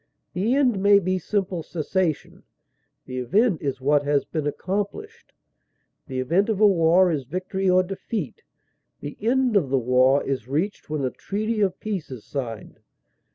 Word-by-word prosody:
The 215 Hz, +8 st, +1 dB
end 250 Hz, -8 st, +2 dB
may 200 Hz, 0 st, +6 dB
be 185 Hz, -1 st, 0 dB
simple 190 Hz, -1 st, -2 dB
cessation; 165 Hz, 0 st, -2 dB, 0.6 s
the 130 Hz, 0 st, -5 dB
event 195 Hz, -, +1 dB
is 135 Hz, -2 st, -3 dB
what 145 Hz, +2 st, +2 dB
has 145 Hz, -1 st, +1 dB
been 155 Hz, -3 st, -3 dB
accomplished; 210 Hz, -, -4 dB, 0.8 s
the 130 Hz, -1 st, -4 dB
event 170 Hz, -, +1 dB
of 215 Hz, -3 st, 0 dB
a 215 Hz, -, +6 dB
war 180 Hz, -1 st, +4 dB
is 145 Hz, -4 st, -2 dB
victory 185 Hz, +5 st, -2 dB
or 185 Hz, 0 st, +4 dB
defeat; 195 Hz, -, -5 dB, 0.6 s
the 145 Hz, -, -6 dB
end 250 Hz, +1 st, +2 dB
of 165 Hz, -10 st, +2 dB
the 135 Hz, -, +2 dB
war 130 Hz, +3 st, +3 dB
is 130 Hz, -4 st, -3 dB
reached 160 Hz, +10 st, -2 dB
when 150 Hz, -3 st, -1 dB
a 130 Hz, -, -1 dB
treaty 215 Hz, +2 st, -3 dB
of 190 Hz, -2 st, 0 dB
peace 200 Hz, -7 st, -4 dB
is 125 Hz, -5 st, -9 dB
signed. 115 Hz, -7 st, -6 dB
180 Hz, 160 wpm, -24 LUFS, 140-205 Hz, 0.8 s, may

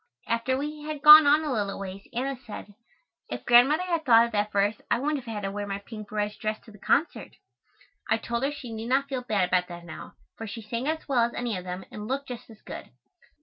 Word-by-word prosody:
After 230 Hz, +3 st, 0 dB
we 300 Hz, +2 st, -5 dB
had 300 Hz, -1 st, -6 dB
gone 300 Hz, 0 st, +11 dB
on 300 Hz, +2 st, +5 dB
a 295 Hz, -4 st, -1 dB
little 205 Hz, -3 st, -2 dB
ways, 195 Hz, 0 st, -8 dB
Anna 265 Hz, +3 st, -2 dB
said: 215 Hz, -4 st, -10 dB, 0.6 s
"If -, -, -6 dB
Grandmother 265 Hz, +8 st, +6 dB
had 340 Hz, -3 st, -1 dB
thought 230 Hz, -4 st, +6 dB
of 235 Hz, -, -6 dB
that 210 Hz, -1 st, 0 dB
verse 205 Hz, +1 st, +1 dB
I 235 Hz, -, +3 dB
wouldn't 285 Hz, +1 st, -1 dB
have 230 Hz, -, -7 dB
had 210 Hz, -2 st, -4 dB
to 195 Hz, -, -2 dB
wear 205 Hz, 0 st, -4 dB
my 195 Hz, 0 st, -3 dB
pink 215 Hz, 0 st, -10 dB
barège 210 Hz, 0 st, -3 dB
dress 215 Hz, -1 st, -2 dB
to 225 Hz, -, -16 dB
the 210 Hz, -, -16 dB
concert." 315 Hz, -, 0 dB, 0.7 s
I 225 Hz, -, +3 dB
told 235 Hz, +1 st, -3 dB
her 275 Hz, +2 st, 0 dB
she 255 Hz, -5 st, -8 dB
need 225 Hz, +1 st, -5 dB
not 275 Hz, +2 st, +2 dB
feel 260 Hz, -2 st, -2 dB
bad 205 Hz, -7 st, 0 dB
about 180 Hz, -1 st, +2 dB
that 175 Hz, -1 st, -9 dB
now, 160 Hz, -, -9 dB, 0.2 s
for 225 Hz, -, -6 dB
she 225 Hz, +2 st, -7 dB
sang 235 Hz, +5 st, -4 dB
as 315 Hz, +1 st, -2 dB
well 255 Hz, -4 st, +3 dB
as 235 Hz, -, -5 dB
any 240 Hz, -3 st, -2 dB
of 180 Hz, 0 st, -6 dB
them 180 Hz, +1 st, -6 dB
and 210 Hz, 0 st, -7 dB
looked 275 Hz, +2 st, -3 dB
just 245 Hz, -1 st, -8 dB
as 220 Hz, -2 st, -16 dB
good. -, -, -8 dB
235 Hz, 245 wpm, -27 LUFS, 210-275 Hz, 0.7 s, gone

